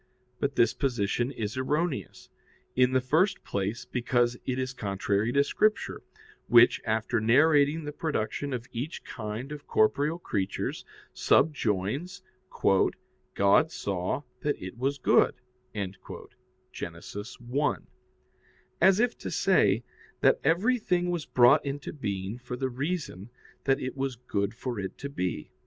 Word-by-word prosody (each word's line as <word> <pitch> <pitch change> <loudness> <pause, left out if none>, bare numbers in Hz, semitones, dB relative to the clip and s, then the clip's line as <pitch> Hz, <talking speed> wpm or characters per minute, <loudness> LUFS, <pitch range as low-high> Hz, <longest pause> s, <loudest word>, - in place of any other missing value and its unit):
But 140 -1 -1
this 115 - +4
position 120 -3 0
is 115 -3 -4
erroneous. 150 +3 -2 0.5
In 125 0 +4
the 130 - +4
first 160 +10 +2
place, 100 +4 -3
because 120 -1 +1
it 130 -1 -1
is 130 -1 -2
contrary 100 0 -1
to 140 - +4
Scripture, 215 +8 0 0.5
which, 120 0 +6
after 110 0 0
narrating 145 +6 +4
the 150 - -4
production 145 -2 -2
of 125 -2 -3
each 130 +8 -5
kind 115 +4 -6
of 150 -1 -8
corporeal 145 +9 +2
creatures, 100 - -3 0.3
subjoins, 135 - +1 0.3
"God 100 - +1
saw 95 - -2 0.2
that 145 +3 -1
it 95 0 -7
was 135 +4 -1
good" - - +3 0.4
(Gen. 100 -2 -3 1.0
1), 120 +7 -3 0.9
as 190 +2 +6
if 245 +1 +1
to - - -5
say 115 - +3 0.4
that - - +4
everything 180 - +2
was 170 -4 -3
brought 120 -1 +5
into 140 0 -5
being 100 -5 -4
for 125 0 -6
the 130 +1 -1
reason 135 - -4 0.4
that 135 0 +3
it 130 -2 -4
was 135 -1 -2
good 105 -3 -2
for 120 -2 -4
it 95 -1 -5
to 140 - -6
be. 90 - -3
125 Hz, 130 wpm, -28 LUFS, 110-145 Hz, 1.0 s, which